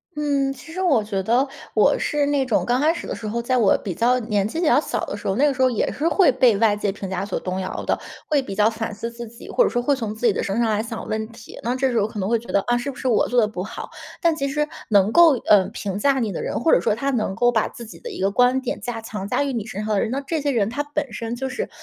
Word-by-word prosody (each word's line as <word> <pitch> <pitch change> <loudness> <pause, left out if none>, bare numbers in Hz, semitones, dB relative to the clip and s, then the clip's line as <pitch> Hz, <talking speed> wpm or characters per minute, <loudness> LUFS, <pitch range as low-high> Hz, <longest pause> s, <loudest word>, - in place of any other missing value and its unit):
嗯， 280 -2 0
其 320 - -13
实 370 - -6
我 290 - +3
觉 195 -2 -2
得 245 +6 +2 0.3
我 - - +4
是 295 -1 0
那 285 -2 +1
种 235 - +1
刚 245 +1 +2
开 315 +3 +3
始 - - -7
的 - - -3
时 220 - -6
候， 235 +3 -2
在 255 +2 0
我 220 -5 +4
比 185 -5 -4
较 250 +2 +2
年 210 -3 0
纪 320 +9 -4
比 350 - 0
较 290 - +5
小 - - -3
的 205 - -4
时 - - -7
候， 195 - +1
那 290 +4 +4
个 - - +2
时 - - -14
候 255 -1 +4
也 225 - 0
是 310 +4 -1
会 335 -5 +4
被 250 -4 +4
外 220 -2 +4
界 205 -1 -1
评 195 -1 -7
价 190 +1 -2
所 200 - -3
动 185 +1 -3
摇 185 - -4
的， - - 0 0.3
会 295 - +3
比 260 -7 -5
较 210 +2 +3
反 225 -1 -4
思 230 +3 -5
自 235 0 -8
己， 230 +2 -13
或 - - +3
者 - - +2
说 245 - 0
会 280 +3 +2
从 225 -5 -4
自 220 +3 0
己 220 - +5
的 - - -2
身 200 +4 -1
上 230 -2 +2
来 215 +1 0
想 225 -1 -6
问 220 0 -2
题， 225 -1 -13
那 240 +2 0
这 265 0 +1
时 230 - +1
候 205 - +1
可 215 - -7
能 190 +2 -1
会 235 - +3
觉 235 - -12
得， 200 - +3
啊， 240 - +3
是 260 +4 -3
不 - - -14
是 260 - -3
我 230 - +3
做 245 -1 +3
得 210 - +2
不 185 -4 -5
好？ 210 - -7 0.3
但 335 -3 +3
其 275 -2 -2
实 300 +2 -1 0.2
能 205 0 +4
够， 340 +1 +7 0.2
呃， 200 -3 +6
评 195 -1 -4
价 270 +4 +2
你 220 -4 -1
的 - - -4
人， - - -2
或 320 - +2
者 - - +6
说 195 - +1
他 275 +5 -2
能 215 -7 -1
够 240 +5 +3
把 220 -3 +1
自 235 - -10
己 225 - -11
的 480 - -7
一 - - -8
个 195 - +3
观 250 +4 +3
点 255 - -3
加 225 0 -4
强 210 -3 -6
加 285 - +1
于 280 - -2
你 230 -5 -3
身 215 -2 -5
上 215 -1 0
的 - - +2
人， 230 - -1
那 275 +2 -1
这 315 +3 -2
些 285 - 0
人 220 -5 +1
他 290 +5 -2
本 290 -3 -3
身 230 +2 -4
就 265 +2 -3
是 - - -3
235 Hz, 345 characters per minute, -22 LUFS, 210-275 Hz, 0.3 s, 够